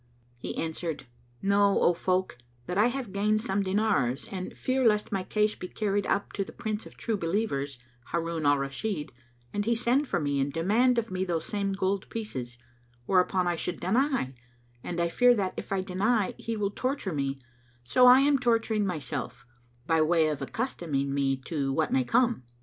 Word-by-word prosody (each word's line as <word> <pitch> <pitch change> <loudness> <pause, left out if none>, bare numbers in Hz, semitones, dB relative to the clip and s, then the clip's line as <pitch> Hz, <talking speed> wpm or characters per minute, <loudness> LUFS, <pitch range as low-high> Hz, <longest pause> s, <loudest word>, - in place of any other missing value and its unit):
He - - -5
answered, 160 -2 -3 0.4
"Know, 200 0 +4
O 175 - +4
folk, 185 -5 -1 0.3
that 180 - -4
I 210 +4 +5
have 245 -5 -4
gained 210 +2 +2
some 200 -3 -1
dinars 190 - 0
and 185 -2 -6
fear 260 0 0
lest 210 -1 +2
my 195 -2 0
case 210 +3 +1
be 180 - -7
carried 205 0 -1
up 200 - -1
to 200 - -1
the - - -11
Prince 215 0 -4
of - - -16
True 225 - -1
Believers, 165 - -1 0.3
Harun 165 -1 -2
al 145 0 +5
Rashid, 150 +5 -3 0.4
and 205 0 -1
he 235 +1 +2
send 245 +5 +1
for 175 - 0
me 145 -2 0
and 135 +1 0
demand 220 - +2
of 230 -3 -1
me 185 0 -1
those 170 -3 -2
same 200 -1 -1
gold 195 0 -1
pieces; 130 - -5 0.5
whereupon 185 +1 +2
I 175 - +1
should 175 +2 -3
deny, 235 - +1 0.5
and 175 - -4
I 170 - +2
fear 245 +8 +4
that, 190 -4 -1
if - - -7
I 195 -1 +1
deny, 195 +3 +1
he 230 -1 -3
will 205 -1 -1
torture 255 - -2
me, 140 -2 -2 0.4
so 250 - +5
I 250 +2 +8
am 280 0 +3
torturing 225 -4 +1
myself, 135 -7 -4 0.4
by 165 0 +3
way 160 0 +3
of 150 -3 -3
accustoming 150 - -2
me 135 -1 +1
to 140 -4 -1
what 155 +3 0
may 130 - +3
come." 240 - +2
190 Hz, 185 wpm, -28 LUFS, 160-220 Hz, 0.5 s, I